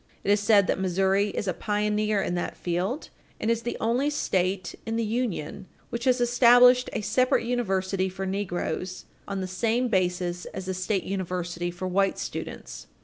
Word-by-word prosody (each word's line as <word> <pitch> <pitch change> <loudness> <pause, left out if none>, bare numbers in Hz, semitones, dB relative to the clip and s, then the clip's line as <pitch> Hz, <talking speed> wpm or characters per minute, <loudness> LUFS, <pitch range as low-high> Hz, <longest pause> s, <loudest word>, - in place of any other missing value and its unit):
It 200 - +2
is 205 - +4
said 205 -1 +5
that - - 0
Missouri 190 +2 +2
is 205 - -4
a 185 - +1
pioneer 210 +1 0
in - - -2
that 175 - -3
field 185 - -2 0.3
and 225 - +1
is 230 0 0
the 240 - -4
only 245 +6 +1
State 185 -9 -1
in 225 - -3
the 230 0 0
Union 210 -5 -3 0.2
which 235 0 -3
has 255 -1 +3
established 245 +1 +6
a - - -2
separate 235 +4 +2
university 195 -5 0
for 190 +1 -5
negroes 185 -2 -3 0.2
on 195 -1 -3
the 185 - -3
same 230 +6 0
basis 180 -3 0
as 190 - -7
the 190 - -2
state 185 +1 -1
university 180 -2 -3
for 175 +2 -5
white 195 +1 +1
students. - - -6
195 Hz, 175 wpm, -26 LUFS, 185-230 Hz, 0.3 s, established